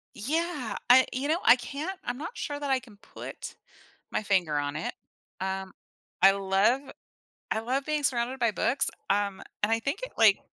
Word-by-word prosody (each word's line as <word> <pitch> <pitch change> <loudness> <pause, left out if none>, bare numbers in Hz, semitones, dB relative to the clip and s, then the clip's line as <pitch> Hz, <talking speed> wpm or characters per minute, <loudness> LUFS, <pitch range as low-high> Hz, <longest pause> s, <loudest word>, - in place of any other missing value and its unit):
Yeah. 300 0 -2
I 260 +1 +8
you 265 +3 -1
know, 325 +3 +2
I - - +9
can't 290 +10 -5
I'm 245 +1 -3
not 330 - -6
sure 290 -1 -3
that 285 -1 -3
I 265 - +3
can 230 -5 -16
put - - -9 0.6
my - - 0
finger 180 -7 +1
on 145 0 -2
it, 155 - -3 0.5
um, 190 0 -3 0.5
I 195 +1 +9
love 195 +6 +2 0.7
I 220 - +1
love 260 +4 -1
being 305 -1 -1
surrounded 250 0 0
by 235 -2 +3
books. 250 +5 +1 0.2
Um, 200 -1 +1 0.2
and 210 - +3
I 225 - +3
think 280 - -2
it - - -5
like 215 -3 +6
240 Hz, 180 wpm, -28 LUFS, 200-280 Hz, 0.7 s, I